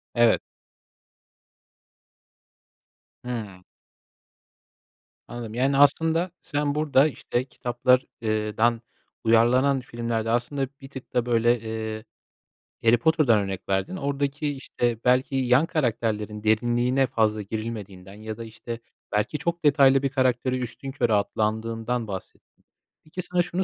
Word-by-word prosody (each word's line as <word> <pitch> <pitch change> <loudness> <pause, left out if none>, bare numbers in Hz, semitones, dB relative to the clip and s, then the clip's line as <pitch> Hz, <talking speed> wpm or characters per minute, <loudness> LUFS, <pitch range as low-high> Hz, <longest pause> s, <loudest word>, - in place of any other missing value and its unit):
Evet. 120 -1 +4 2.8
Hı. 110 -7 -6 1.6
Anladım, 120 -2 -7
yani, 135 +3 +1
aslında 165 +5 +3
sen 145 0 -1
burada, 150 -2 +4
işte, 130 -3 -3
kitaplar 125 0 +1 0.2
eee, 110 -1 -1
dan 115 +1 +2 0.4
uyarlanan 125 +5 +4
filmlerde 115 -2 -3
aslında 125 +4 0
bir 135 - -10
tık 130 -2 -10
da, 120 -1 +1
böyle, 120 0 +3
eee, 110 0 -5 0.8
Harry 115 +1 +5
Potter'dan 150 -5 +3
örnek 95 -1 -5
verdin. 100 - 0
Oradaki, 140 0 -2
işte, 120 -3 -1
belki 125 +2 +3
yan 130 +3 +3
karakterlerin 110 -8 -2
derinliğine 120 +4 +2
fazla 110 -2 +1
girilmediğinden 100 -3 -6
ya 110 +1 -7
da, 115 - -6
işte, 115 +1 -7 0.3
belki 105 +8 0
çok 170 +2 -3
detaylı 135 -2 +5
bir 135 - +2
karakteri 130 -1 +1
üstünkörü 125 -1 -2
atlandığından 110 +3 -1
bahsettin. 95 -2 -10 0.4
Peki, 155 +4 -6
sana 180 0 0
şunu 180 +2 -1
120 Hz, 115 wpm, -25 LUFS, 110-135 Hz, 2.8 s, Harry